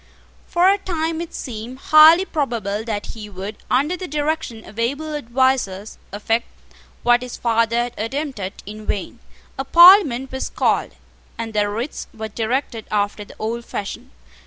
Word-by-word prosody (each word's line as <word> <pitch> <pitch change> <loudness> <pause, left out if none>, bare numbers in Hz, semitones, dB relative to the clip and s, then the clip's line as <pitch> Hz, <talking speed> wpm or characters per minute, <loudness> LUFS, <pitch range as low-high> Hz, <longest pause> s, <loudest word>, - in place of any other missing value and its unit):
For 350 +1 +3
a 400 +1 +4
time 330 -3 -2
it 340 0 -6
seemed 240 0 -7
highly 310 +6 +7
probable 230 - -2
that 210 -3 -3
he 215 -2 -9
would, 200 +2 -7
under 290 +8 +2
the 365 0 -6
direction 295 -6 -2
of 215 - -11
able 285 +7 -2
advisers, 240 -7 0
effect 225 +3 -1 0.6
what 240 0 +4
his 250 -1 -7
father 230 -1 +1
had 240 0 0
attempted 225 -4 -4
in 215 +1 -9
vain. 205 +4 -3 0.4
A - - 0
Parliament 340 - +7
was 265 - -3
called, - - 0 0.4
and 225 -1 -5
the 205 -1 +1
writs 230 +8 -4
were 220 0 -5
directed 230 +1 -2
after 205 0 -1
the - - -15
old 230 +2 -3
fashion. 230 +4 -6
240 Hz, 155 wpm, -21 LUFS, 215-295 Hz, 0.6 s, highly